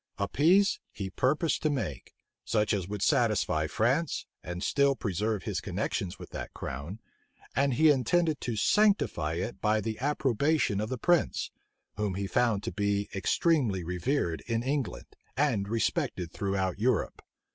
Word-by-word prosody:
A 100 - -1
peace 180 - +4
he 100 -3 -5
purposed 150 - +1
to 155 - +2
make; 75 - -4 0.3
such 105 -1 +1
as 95 -4 -1
would 105 0 -3
satisfy 80 0 +2
France, 130 - 0 0.2
and 90 +2 -5
still 140 +3 +3
preserve 105 -1 -2
his - - -2
connections 95 0 -3
with - - -11
that - - -7
crown; 70 - -6 0.6
and 135 -2 +2
he 155 +3 +6
intended 150 +4 +1
to 120 - -2
sanctify 110 - +2
it 95 +7 -4
by 110 0 +2
the 110 0 -4
approbation 140 -4 +1
of 110 - -3
the 130 - -2
prince, 175 +6 +1 0.5
whom 105 -3 -1
he 100 +1 -2
found 115 -1 +1
to - - -3
be 100 -1 -1
extremely 105 - +1
revered 90 - -1
in 115 0 0
England, 135 -8 -2 0.3
and 125 -9 +1
respected 95 -5 -1
throughout 95 -2 -1
Europe. 120 -1 0
110 Hz, 150 wpm, -29 LUFS, 95-140 Hz, 0.6 s, he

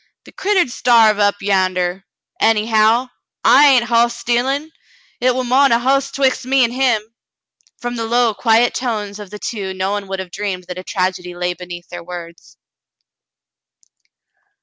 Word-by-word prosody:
"The - - -15
critter 385 -2 +1
'd 250 - -11
starve 225 -3 +4
up 205 -1 +3
yander. 185 -1 0 0.3
Anyhow, 225 +2 +2 0.3
I 295 - +6
ain't 260 -4 +5
hoss 235 0 +1
stealin'. 270 +6 -1 0.5
Hit 250 0 +2
war 255 - -1
mo'n 265 +2 +3
a 230 - +5
hoss 275 +3 +1
'twixt 270 -1 0
him 260 +2 -5
an' 250 -3 +3
me." 245 -5 +1 0.7
From 245 0 -5
the 225 -1 -3
low, 235 -1 +2
quiet 230 +2 +2
tones 215 -5 -4
of 205 -2 -9
the 210 - -8
two 200 -3 -5
no 190 +1 -2
one 205 -1 -3
would 195 0 -4
have 190 -2 -7
dreamed 195 -2 -4
that 180 0 -8
a - - -8
tragedy 185 -2 -3
lay 180 0 -2
beneath 175 0 -10
their 175 -1 -8
words. 170 -1 -10
220 Hz, 165 wpm, -18 LUFS, 190-245 Hz, 0.7 s, I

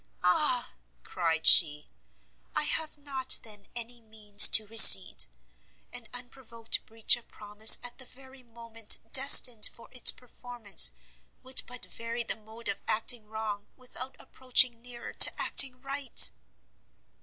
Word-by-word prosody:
"Ah!" 245 +7 -4 0.3
cried 165 -3 -6
she, 150 -3 +4 0.7
"I - - -3
have 315 -1 -6
not, 275 -3 -1
then, 210 -3 -15
any 240 0 -10
means 215 -2 +3
to 220 - 0
recede! 205 - +5 0.7
an - - -10
unprovoked 245 -2 -7
breach 225 0 +1
of 240 - -18
promise 210 +1 +3
at 245 +2 -11
the 260 - -8
very 265 +1 -17
moment 230 -2 -3 0.2
destined 255 -4 +4
for 235 - -18
its 255 - +2
performance, 240 - -2 0.5
would 260 0 -2
but 250 0 -11
vary 230 +1 -9
the - - -6
mode 220 +2 -13
of 200 - -7
acting 225 0 -4
wrong, 215 -2 -10
without 255 0 -11
approaching 250 -2 -1
nearer 240 -1 -14
to - - +4
acting 260 -2 0
right!" 275 - +1
235 Hz, 130 wpm, -24 LUFS, 215-255 Hz, 0.7 s, recede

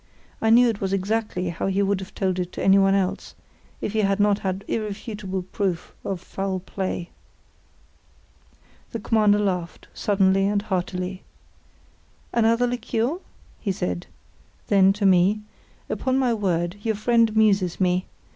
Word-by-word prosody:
I 220 - +2
knew 240 +2 +7
it 225 -3 -2
was 195 0 -1
exactly 195 -2 -1
how 170 +2 -3
he 195 +1 +1
would 200 -1 +1
have 190 +2 -10
told 185 -2 0
it 180 0 -3
to - - -4
anyone 195 0 +5
else, 190 -2 -2 0.5
if 205 - -3
he 220 - +1
had 195 -1 +1
not 205 0 +3
had 190 +1 -3
irrefutable 205 -3 -4
proof 185 -2 -3
of 190 -2 -3
foul 190 +1 -3
play. 185 -1 -4 1.8
The 230 - -2
Commander 210 -1 +3
laughed, 180 -4 -2
suddenly 195 -1 +2
and 205 0 0
heartily. 185 -1 -3 1.1
"Another 230 +1 +3
liqueur?" 245 +5 -1 0.4
he 200 - -1
said. 90 - -3 0.6
Then, 195 -1 +6
to 205 0 -2
me: 190 +3 +4 0.5
"Upon 260 0 -1
my 255 -3 +2
word, 180 -3 -1
your 220 0 0
friend 230 +2 +3
amuses 205 -5 +2
me. 180 -1 +1
195 Hz, 145 wpm, -24 LUFS, 185-215 Hz, 1.8 s, knew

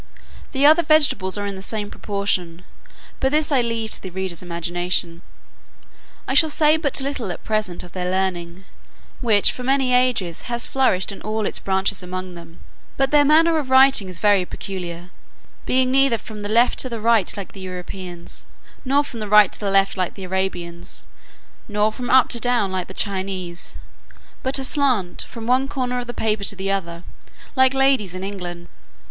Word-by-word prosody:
The 275 -1 +2
other 315 +3 +7
vegetables 295 - +3
are 205 - -3
in 200 -1 -4
the 190 - -8
same 205 0 -3
proportion; 185 -4 -3 0.6
but 265 - +1
this 305 +1 +2
I 270 -3 +4
leave 230 -2 -3
to - - -7
the 190 - -7
reader's 185 -1 -4
imagination. 175 0 -2 1.1
I - - 0
shall 315 +3 +5
say 305 +1 +4
but 305 -4 -1
little 265 -8 -3
at - - -8
present 215 -5 -2
of 175 - -12
their 180 0 -3
learning, 185 -1 -2 0.5
which, 215 -5 +3
for - - -8
many 265 0 +1
ages, 245 -8 +1
has 235 -1 -1
flourished 235 -8 +1
in 200 - -10
all 215 0 -2
its - - 0
branches 190 0 -1
among 185 0 -6
them: 170 -1 -13 0.4
but 270 0 +1
their 295 -1 +5
manner 320 +2 +4
of 275 -4 -5
writing 260 -6 +5
is 180 - -6
very 205 -3 +3
peculiar, 180 -1 -7 0.6
being 255 0 +2
neither 270 -3 +4
from 215 -1 -10
the 205 - -5
left 235 +3 +3
to 255 - 0
the 230 -2 -5
right, 225 -3 +2
like 195 -3 -6
the 195 - -12
Europeans, 180 -1 -7 0.4
nor 275 +2 +2
from 240 -5 -9
the 210 -1 -5
right 210 -1 +6
to - - -8
the 205 - -2
left, 195 0 +2
like 185 -2 -2
the 195 - -9
Arabians, 180 -2 -3 0.6
nor 210 0 +1
from 245 +2 -6
up 260 -1 +6
to 235 - 0
down, 240 -5 +1
like 185 -1 -3
the 190 - -11
Chinese, 190 -3 -3 0.6
but 260 +1 0
aslant, 260 -9 +1
from 230 -1 -8
one 255 +3 +2
corner 250 -2 -2
of 245 - -6
the - - -3
paper 215 -3 -1
to 205 - +4
the 195 0 -3
other, 170 -3 -3 0.5
like 260 0 +4
ladies 265 -9 +2
in 185 - -6
England. 175 -3 -6
205 Hz, 185 wpm, -21 LUFS, 185-255 Hz, 1.1 s, other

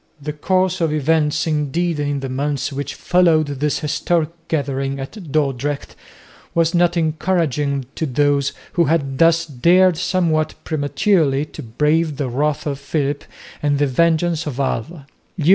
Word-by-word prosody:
The 150 +1 -5
course 185 +4 0
of 165 -2 +2
events 155 0 +1
indeed 155 +2 -1
in 145 -1 -1
the 135 - -3
months 140 +1 -2
which 140 0 -4
followed 170 -3 +3
this 145 +1 -2
historic 155 +1 0 0.2
gathering 135 -2 -2
at 155 +4 -8
Dordrecht 145 -1 -1 0.6
was 165 0 +2
not 175 0 +3
encouraging 155 -4 0
to 160 - -2
those 140 +1 +1 0.2
who 170 - +3
had 140 -3 0
thus 165 0 +4
dared 170 +5 +3
somewhat 160 -4 0
prematurely 150 -1 +1
to - - -10
brave 150 +6 0
the 140 -3 -2
wrath 145 +4 -1
of 140 -2 -3
Philip 145 0 -2 0.4
and 145 -1 +1
the 145 - +2
vengeance 165 +3 +1
of 140 -2 -4
Alva. 140 +3 -3
150 Hz, 145 wpm, -20 LUFS, 140-165 Hz, 0.6 s, thus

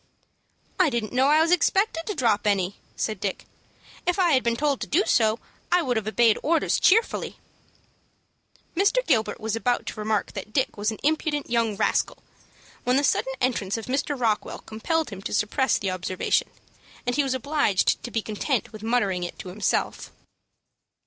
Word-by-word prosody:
"I 365 -4 +5
didn't 235 -4 -3
know 260 +2 +3
I 305 +2 +5
was 330 +1 +2
expected 360 -1 +2
to 420 - -2
drop 225 -7 +1
any," 195 -2 0 0.2
said 215 -3 -2
Dick. 195 -2 -3 0.6
"If 355 +1 +2
I 360 -3 +3
had 260 -3 +4
been 235 -1 0
told 285 +1 0
to - - -3
do 355 +7 +3
so, 220 -1 +3 0.3
I 355 -1 +4
would 250 -5 0
have 220 -2 -2
obeyed 225 0 +3
orders 325 +1 +1
cheerfully." 450 +5 +2 1.4
Mr. 410 +7 +2
Gilbert 220 - +1
was 220 0 -2
about 245 +2 0
to - - -6
remark 215 -1 -1
that 205 +2 -8
Dick 265 - 0
was 210 +1 -1
an 220 - -4
impudent 295 -2 0
young 230 -3 +1
rascal, - - +1 0.7
when 250 +1 +2
the 285 - +2
sudden 265 -1 +1
entrance 230 -5 0
of 225 - -6
Mr. 275 +1 -1
Rockwell 220 -3 -1
compelled 315 +7 -2
him 195 -1 -7
to 200 - -3
suppress 260 +6 +1
the 195 -2 -2
observation, 185 0 -1 0.6
and 245 - 0
he 295 - +3
was 270 -2 -1
obliged 260 -7 +1
to - - -6
be 225 -2 -2
content 220 +4 -2
with 215 - -9
muttering 215 -6 0
it 175 - -6
to 185 - -8
himself. 200 +3 -1
240 Hz, 180 wpm, -25 LUFS, 215-295 Hz, 1.4 s, I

